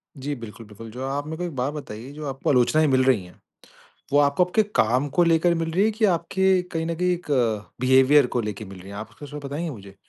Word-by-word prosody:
जी 140 +2 -4
बिल्कुल, 115 -1 -10
बिल्कुल। 110 +2 -11
जो 130 +3 -5
आप 145 +2 -3
मेरे 160 0 -5
को 180 - -4
एक 170 -5 -5
बात 130 +4 -1
बताइए, 130 -3 -8
जो 150 0 -7
आपको 135 0 -3
आलोचनाएँ 150 +4 +3
मिल 130 -1 +3
रही 120 -8 +3
हैं 90 - -17 0.7
वो 145 - +5
आपको 145 +5 +4
आपके 215 +5 +2
काम 125 +6 +2
को 175 - +5
लेकर 170 +1 +3
मिल 165 0 -2
रही 185 +5 +1
हैं 220 - +2
कि 220 +1 -1
आपके 185 +1 +1 0.3
कहीं 165 0 -1
न 165 - -2
कहीं 180 +1 +1
एक 175 0 -5 0.5
बिहेवियर 130 +2 +5
को 120 - -2
लेके 105 0 -5
मिल 95 -1 -11
रही 95 - -12
हैं? 100 - -8
आप 105 - -7
उसको 145 - -11
कुछ 145 0 -9
बताएँगे 150 +4 -3
मुझे? 100 -6 -11
140 Hz, 250 wpm, -24 LUFS, 120-165 Hz, 0.7 s, वो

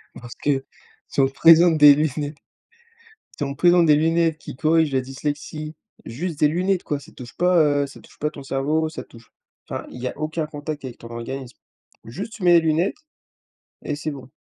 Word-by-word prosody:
Parce 120 -1 -10
que, 135 -2 -1 0.4
si - - -4
on 135 - +4
présente 165 +4 +6
des 145 -1 +9
lunettes 150 0 -2 1.0
si 145 - -1
on 140 0 -4
présente 175 +2 +4
des 150 -1 +6
lunettes 165 0 +2
qui 140 - -10
corrigent 160 -1 +2
la 130 - +3
dyslexie, 145 +3 -5 0.3
juste 155 +6 -5
des 150 - +5
lunettes, 180 +3 0
quoi, 145 -1 -3
ça 160 +5 -16
touche 125 -2 -11
pas, 180 +1 +3 0.3
heu, - - -1
ça 140 - -13
touche - - -20
pas 150 - 0
ton 140 - -10
cerveau, 145 +4 -1
ça - - -7
touche 115 -1 -18 0.4
enfin, - - -5
il 125 - -10
y 130 - -2
a - - -6
aucun 155 0 -2
contact 150 -1 -6
avec 125 -2 -8
ton 115 - -11
organisme. 125 +2 -7 0.5
Juste, 200 - -7
tu 210 - -11
mets 175 -1 +6
les 170 - +7
lunettes 165 - 0 0.9
et - - -3
c'est 155 0 -4
bon. 135 -2 -10
150 Hz, 200 wpm, -22 LUFS, 135-165 Hz, 1.0 s, des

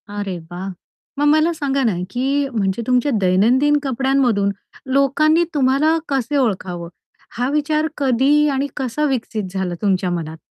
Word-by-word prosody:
अरे 205 -3 -4
वाह! 185 +2 -5 0.5
मग 290 - +2
मला 310 +3 +4
सांगा 275 -3 -1
ना 225 -5 +2 0.2
की 275 +4 0
म्हणजे 200 -1 -1
तुमच्या 250 +2 +2
दैनंदिन 240 +11 +3
कपड्यांमधून 260 -6 +1 0.4
लोकांनी 305 +4 +3
तुम्हाला 290 +3 +2
कसं 275 +1 0
ओळखावं? 185 -8 -2 0.5
हा 245 +2 0
विचार 305 +1 0
कधी 280 +3 +3
आणि 275 +1 -1
कसा 265 +2 -1
विकसित 230 -4 -2
झाला 190 -2 -2
तुमच्या 190 -3 +1
मनात? 160 -2 -4
260 Hz, 135 wpm, -19 LUFS, 200-285 Hz, 0.5 s, मला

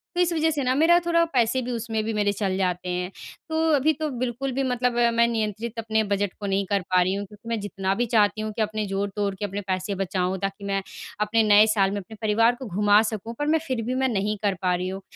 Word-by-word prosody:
तो 355 - +2
इस 350 -1 +2
वजह 320 0 +2
से 295 -3 -1
ना, 255 0 +2
मेरा 325 +4 +5
थोड़ा 335 0 +3
पैसे 245 +1 +2
भी 250 0 -4
उसमें 225 -2 -2
भी 225 +1 -2
मेरे 205 -1 +1
चल 195 -2 -1
जाते 180 -1 -1
हैं। 180 +1 -2 0.4
तो 320 0 -1
अभी 295 +2 +3
तो 310 0 -3
बिल्कुल 255 +1 -3
भी 270 +2 0
मतलब 250 -1 0 0.2
मैं 235 0 +4
नियंत्रित 225 0 -3
अपने 220 0 0
बजट 200 -2 -1
को 205 - -5
नहीं 195 0 0
कर 200 -1 +1
पा 185 -1 +4
रही 185 +1 +1
हूँ 200 +1 -3
क्योंकि 210 +4 -13
मैं 230 -1 -1
जितना 195 -1 -2
भी 240 - 0
चाहती 215 -2 +2
हूँ 215 0 -3
कि 220 - -3
अपने 215 0 -1
जोड़-तोड़ 200 +1 -2
के 205 - -4
अपने 200 +1 -4
पैसे 185 +1 -2
बचाऊँ, 185 -1 -1
ताकि 195 +1 -4
मैं 195 0 -1 0.4
अपने 220 +2 +2
नए 210 0 +6
साल 195 -3 +2
में 205 - -2
अपने 205 +4 -12
परिवार 225 +2 +3
को 265 - -6
घुमा 205 +2 +4
सकूँ, 220 +2 -5
पर 295 - 0
मैं 320 +1 +3
फिर 255 -4 -1
भी 250 +2 -2
मैं 265 0 +1
नहीं 210 -1 -1
कर 200 -2 +1
पा 180 -1 +2
रही 180 +1 -3
हूँ। 190 +1 -6
215 Hz, 255 wpm, -24 LUFS, 195-240 Hz, 0.4 s, नए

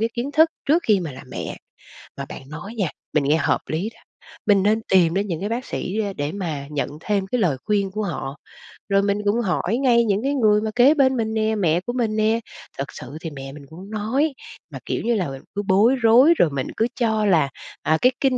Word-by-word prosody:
cái 225 - +2
kiến 250 +4 -3
thức 320 +2 +5 0.2
trước 325 +5 +4
khi 210 - +3
mà 160 -6 -5
làm 130 +1 -11
mẹ. - - -5 0.6
Mà - - -4
bạn 135 - -10
nói 160 +9 -8
nha, 200 -7 0 0.3
mình 150 -3 +3
nghe 150 +3 +3
hợp 150 - +1
lý 165 +7 -2
đó. 225 - -21 0.5
Mình 200 -2 +4
nên 215 +2 +2
tìm 175 -3 +5
đến 200 +2 0
những 170 -5 -3
cái 205 - -2
bác 240 +3 -3
sĩ 195 +4 -4 0.2
để 145 +1 -2
mà 160 -8 -4
nhận 150 -2 -2
thêm 200 +1 -1
cái 245 +5 -1
lời 170 -9 +2
khuyên 200 -2 +1
của 210 +3 -3
họ, 150 -7 -4 0.5
rồi 195 0 +4
mình 200 0 +1
cũng 205 +3 +2
hỏi 195 +1 0
ngay 240 -3 +3
những 205 +1 0
cái 275 - 0
người 215 -5 +3
mà 220 - -2
kế 250 +4 +6
bên 265 -4 +3
mình 220 -1 -1
nè, 220 0 +1
mẹ 175 -5 +2
của 240 +6 -5
mình 230 -4 0
nè. 220 +1 +2 0.4
Thật 135 - -1
sự 130 +4 -9
thì 165 - -4
mẹ 135 -1 -8
mình 140 0 -11
cũng 185 +5 -11
nói, 245 +8 0 0.4
mà, - - -7
kiểu - - -2
như 235 +1 +1
là, 185 -8 -1 0.3
cứ 205 - 0
bối 210 +7 +4
rối 250 +6 +6
rồi 165 - +4
mình 135 -2 -3
cứ 225 - +2
cho 220 -2 +1
là, 160 -8 +3 0.3
à, 155 - +2
cái 250 - +5
kinh 265 -2 +2
205 Hz, 240 wpm, -22 LUFS, 170-230 Hz, 0.6 s, kế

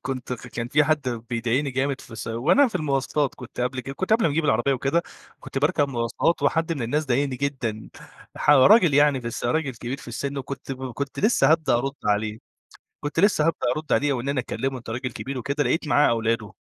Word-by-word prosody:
كنت 130 -2 -4
كان 120 -1 -5
في 150 +3 +3
حد 150 -3 0 0.2
بيضايقني 120 +4 0
جامد 135 +1 -1
في - - -12
س - - -9
وأنا 155 - +3
في 225 - -16
المواصلات، 140 -1 0
كنت 125 -1 -9
قبل 125 +1 -1
كده 135 +2 -7
كنت 190 +8 -2
قبل 225 +1 +4
ما - - +1
أجيب 160 +2 0
العربية 120 0 +2
وكده، 135 +6 0 0.4
كنت - - -5
باركب 145 0 +2
مواصلات 120 +6 0
وحد 165 +4 +1
من 140 -6 -3
الناس 150 +7 -1
ضايقني 130 +1 0
جدًا. 125 -6 -3 0.5
ح - - +2
راجل 170 - +6
يعني 145 -2 +4
بس 120 -1 -5
راجل 140 +4 0
كبير 120 +3 -5
في 140 - -12
السِن 140 +4 -4
وكنت 135 0 -6
كنت 130 +1 -5
لسّه 200 - +3
هابدأ 160 -4 +2
أرُد 135 +3 0
عليه، 105 +1 0 0.6
كنت 145 +2 -1
لسّه 195 -5 +3
هابدأ 165 - 0
أرُد 155 0 -4
عليه 145 0 +2
وإن 130 0 -3
أنا 140 -2 +1
أكلّمه 130 +3 -3
أنت 120 - -10
راجل 130 +2 -3
كبير 135 -1 -5
وكده 140 +4 -1
لقيت 155 +6 0
معاه 145 0 +4
أولاده. 115 -2 -1
135 Hz, 205 wpm, -24 LUFS, 120-150 Hz, 0.6 s, راجل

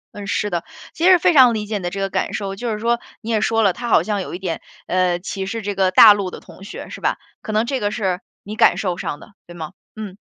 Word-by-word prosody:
嗯， 205 -1 -7
是 205 0 -1
的， 170 -1 -1 0.3
其 330 - -1
实 370 - +8
非 355 +1 +3
常 255 -5 +7
理 210 -1 -3
解 210 0 -2
你 - - -10
的 175 - -1
这 195 +2 -6
个 195 - 0
感 190 - -2
受， 195 -2 -4
就 235 +3 -3
是 215 - -2
说 235 +2 +1 0.2
你 225 - -7
也 215 - +1
说 225 0 +2
了， 195 -3 +3
他 240 +3 -5
好 - - +4
像 210 -2 -1
有 - - -7
一 - - -7
点， 180 -4 -4 0.2
呃， 180 -1 +1
歧 195 +1 -5
视 225 +3 -4
这 205 0 -2
个 190 -1 +3
大 210 +3 +9
陆 200 -2 -3
的 - - -8
同 - - -15
学 200 - -8
是 - - -9
吧， - - 0 0.2
可 - - -6
能 215 +2 +1
这 265 +1 -2
个 205 -3 0
是 190 -5 -2 0.2
你 210 +2 -7
感 - - +4
受 185 -4 -1
上 145 - -4
的， - - -16
对 175 - -11
吗？ 160 -3 -7 0.2
嗯。 205 -3 -7
205 Hz, 310 characters per minute, -20 LUFS, 190-225 Hz, 0.3 s, 大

